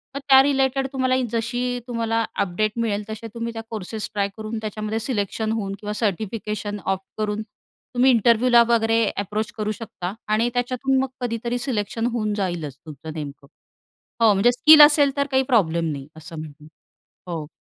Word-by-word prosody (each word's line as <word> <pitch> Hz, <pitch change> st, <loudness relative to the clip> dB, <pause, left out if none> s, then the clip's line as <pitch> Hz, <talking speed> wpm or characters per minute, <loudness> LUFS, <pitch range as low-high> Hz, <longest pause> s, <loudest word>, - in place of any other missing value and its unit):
मग -, -, -2 dB
त्या 265 Hz, -1 st, +9 dB
रिलेटेड 270 Hz, -1 st, +1 dB
तुम्हाला 260 Hz, -1 st, +1 dB, 0.2 s
जशी 245 Hz, +2 st, -1 dB
तुम्हाला 230 Hz, -1 st, 0 dB, 0.2 s
अपडेट 200 Hz, +3 st, 0 dB
मिळेल, 215 Hz, -3 st, -1 dB
तसे 220 Hz, +1 st, -6 dB
तुम्ही 235 Hz, 0 st, -4 dB
त्या 225 Hz, -, -5 dB
कोर्सेस 215 Hz, 0 st, -5 dB
ट्राय 200 Hz, -1 st, 0 dB
करून 220 Hz, +1 st, -5 dB
त्याच्यामध्ये 215 Hz, +1 st, -3 dB
सिलेक्शन 220 Hz, -2 st, -2 dB
होऊन 200 Hz, -3 st, -2 dB
किंवा 210 Hz, 0 st, -4 dB
सर्टिफिकेशन 210 Hz, 0 st, -3 dB
ऑप्ट 190 Hz, 0 st, -1 dB
करून 210 Hz, 0 st, -1 dB
तुम्ही 245 Hz, +4 st, -1 dB
इंटरव्ह्यूला 235 Hz, +1 st, +5 dB
वगैरे 225 Hz, -1 st, +3 dB, 0.2 s
एप्रोच 210 Hz, +2 st, -2 dB
करू 215 Hz, 0 st, -1 dB
शकता. 200 Hz, -4 st, -6 dB
आणि 220 Hz, +3 st, +2 dB
त्याच्यातून 255 Hz, +2 st, 0 dB
मग -, -, -1 dB
कधीतरी 235 Hz, 0 st, -2 dB
सिलेक्शन 225 Hz, -1 st, -2 dB
होऊन 215 Hz, -3 st, -1 dB
जाईलच 175 Hz, -9 st, -3 dB
तुमचं 155 Hz, +1 st, -9 dB
नेमकं. 145 Hz, -2 st, -8 dB, 0.7 s
हो 220 Hz, -2 st, +6 dB
म्हणजे 200 Hz, +5 st, +4 dB
स्किल 305 Hz, +4 st, +8 dB
असेल 290 Hz, -2 st, +6 dB
तर 280 Hz, 0 st, +1 dB
काही 265 Hz, 0 st, +3 dB
प्रॉब्लेम 170 Hz, -6 st, +2 dB
नाही 140 Hz, -2 st, -6 dB
असं 160 Hz, 0 st, -9 dB
म्हणा, 150 Hz, -1 st, -10 dB, 0.7 s
हो. 160 Hz, -3 st, -4 dB
220 Hz, 160 wpm, -23 LUFS, 200-240 Hz, 0.7 s, त्या